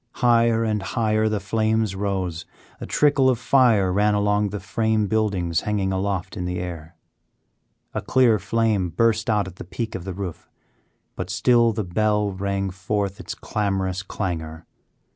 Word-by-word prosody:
Higher 115 Hz, -2 st, +3 dB
and 105 Hz, -2 st, 0 dB
higher 110 Hz, +1 st, 0 dB
the 105 Hz, -1 st, -1 dB
flames 110 Hz, +1 st, 0 dB
rose; 95 Hz, -4 st, -3 dB, 0.3 s
a -, -, -6 dB
trickle 140 Hz, -3 st, +3 dB
of 125 Hz, -, +2 dB
fire 115 Hz, -7 st, +3 dB
ran 105 Hz, +2 st, +3 dB
along 105 Hz, 0 st, +1 dB
the 105 Hz, +1 st, -5 dB
frame 110 Hz, +2 st, 0 dB
buildings 100 Hz, -6 st, 0 dB
hanging 100 Hz, -2 st, -1 dB
aloft 95 Hz, -1 st, -2 dB
in 90 Hz, -, -4 dB
the 90 Hz, 0 st, -3 dB
air. 85 Hz, -2 st, -6 dB, 1.0 s
A -, -, -2 dB
clear 120 Hz, -5 st, +3 dB
flame 105 Hz, -2 st, 0 dB
burst 110 Hz, +5 st, +1 dB
out 105 Hz, -3 st, +1 dB
at 90 Hz, -1 st, -10 dB
the -, -, -7 dB
peak 110 Hz, +6 st, -5 dB
of 90 Hz, -, -5 dB
the 95 Hz, 0 st, -5 dB
roof, 95 Hz, -4 st, -6 dB, 0.7 s
but 90 Hz, -1 st, -5 dB
still 120 Hz, +4 st, +3 dB
the 110 Hz, 0 st, -2 dB
bell 105 Hz, +3 st, +1 dB
rang 100 Hz, 0 st, -2 dB
forth 100 Hz, +1 st, -2 dB
its -, -, -6 dB
clamorous 95 Hz, -3 st, -2 dB
clangor. 85 Hz, -4 st, -5 dB
105 Hz, 160 wpm, -23 LUFS, 95-110 Hz, 1.0 s, Higher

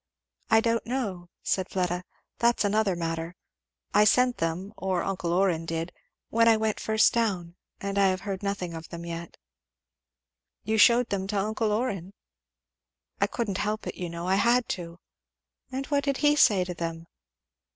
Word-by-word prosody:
"I 220 Hz, 0 st, +5 dB
don't 230 Hz, 0 st, 0 dB
know," 200 Hz, -9 st, -3 dB
said 190 Hz, -1 st, 0 dB
Fleda, 180 Hz, -1 st, -1 dB, 0.4 s
"that's 235 Hz, -2 st, +3 dB
another 205 Hz, -2 st, +2 dB
matter. 165 Hz, 0 st, -3 dB, 0.6 s
I 210 Hz, -, +6 dB
sent 250 Hz, +3 st, +4 dB
them, 170 Hz, +5 st, -2 dB
or 185 Hz, -2 st, -1 dB
uncle 180 Hz, -3 st, -2 dB
Orrin 175 Hz, -3 st, +1 dB
did, 165 Hz, +1 st, -3 dB, 0.4 s
when 230 Hz, 0 st, +3 dB
I 225 Hz, -1 st, +6 dB, 0.2 s
first 220 Hz, +2 st, +2 dB
went 235 Hz, -, +4 dB
down; 175 Hz, -4 st, -5 dB, 0.2 s
and 200 Hz, 0 st, -2 dB
I 195 Hz, -, +5 dB
have 185 Hz, 0 st, 0 dB
heard 195 Hz, -2 st, -4 dB
nothing 200 Hz, -4 st, -3 dB
of 165 Hz, 0 st, -8 dB
them 170 Hz, 0 st, -7 dB
yet." 170 Hz, 0 st, -7 dB, 1.3 s
"You 220 Hz, +1 st, 0 dB
shewed 235 Hz, +2 st, +6 dB
them 190 Hz, -1 st, -1 dB
to 205 Hz, 0 st, -2 dB
uncle 215 Hz, +2 st, 0 dB
Orrin?" 205 Hz, -5 st, -2 dB, 1.2 s
"Couldn't 210 Hz, -6 st, -2 dB
help 210 Hz, +1 st, -2 dB
it, -, -, -4 dB
you 175 Hz, -1 st, -5 dB
know. 170 Hz, +1 st, -6 dB
I 190 Hz, +1 st, +2 dB
had 240 Hz, +3 st, +3 dB
to." 170 Hz, -1 st, -5 dB, 0.7 s
"And 265 Hz, +1 st, -3 dB
what 285 Hz, 0 st, 0 dB
did 280 Hz, -1 st, 0 dB
he 295 Hz, 0 st, +5 dB
say 205 Hz, -10 st, +5 dB
to 180 Hz, 0 st, -5 dB
them?" 165 Hz, -1 st, -5 dB
195 Hz, 165 wpm, -27 LUFS, 175-220 Hz, 1.3 s, I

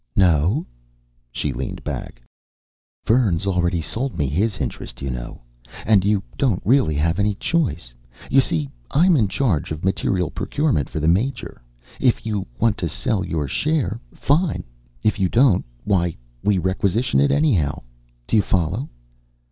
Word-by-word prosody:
"No?" 90 Hz, -, +3 dB, 0.7 s
She 70 Hz, +3 st, -2 dB
leaned 65 Hz, +2 st, -5 dB
back. -, -, -6 dB, 0.8 s
"Vern's 105 Hz, -6 st, +2 dB
already 90 Hz, -3 st, +1 dB
sold 115 Hz, -, -2 dB
me 75 Hz, -, +1 dB
his 95 Hz, -, 0 dB
interest, 65 Hz, -7 st, -5 dB
you 70 Hz, -, -2 dB
know. -, -, -7 dB, 0.4 s
And 105 Hz, -3 st, +4 dB
you 100 Hz, -1 st, +1 dB, 0.2 s
don't 120 Hz, -10 st, +2 dB
really 115 Hz, -, +3 dB
have 85 Hz, +5 st, +1 dB
any 100 Hz, 0 st, +1 dB
choice. 85 Hz, -, -1 dB, 0.3 s
You 135 Hz, +1 st, +5 dB
see, 80 Hz, -, -1 dB, 0.2 s
I'm 175 Hz, +4 st, +4 dB
in 115 Hz, -8 st, +3 dB
charge 100 Hz, -, 0 dB
of 80 Hz, +3 st, -4 dB
materiel 95 Hz, -2 st, 0 dB
procurement 140 Hz, -, 0 dB
for -, -, -4 dB
the 80 Hz, -, 0 dB
Major. 110 Hz, +11 st, 0 dB, 0.4 s
If 125 Hz, -3 st, +2 dB
you 105 Hz, -4 st, -2 dB
want 115 Hz, -1 st, +1 dB
to 85 Hz, -, -1 dB
sell 95 Hz, +4 st, -1 dB
your 80 Hz, -5 st, -2 dB
share, 145 Hz, -, 0 dB
fine. 155 Hz, +3 st, +1 dB, 0.4 s
If 105 Hz, -1 st, +1 dB
you 95 Hz, -2 st, +2 dB
don't, 120 Hz, -6 st, +4 dB, 0.2 s
why, 90 Hz, -4 st, +1 dB, 0.3 s
we 105 Hz, -2 st, +3 dB
requisition 95 Hz, +6 st, +1 dB
it 140 Hz, -, +4 dB
anyhow. 135 Hz, -, +1 dB, 0.4 s
Do -, -, 0 dB
you 105 Hz, -, +6 dB
follow?" 95 Hz, -, -1 dB
95 Hz, 150 wpm, -22 LUFS, 80-120 Hz, 0.8 s, you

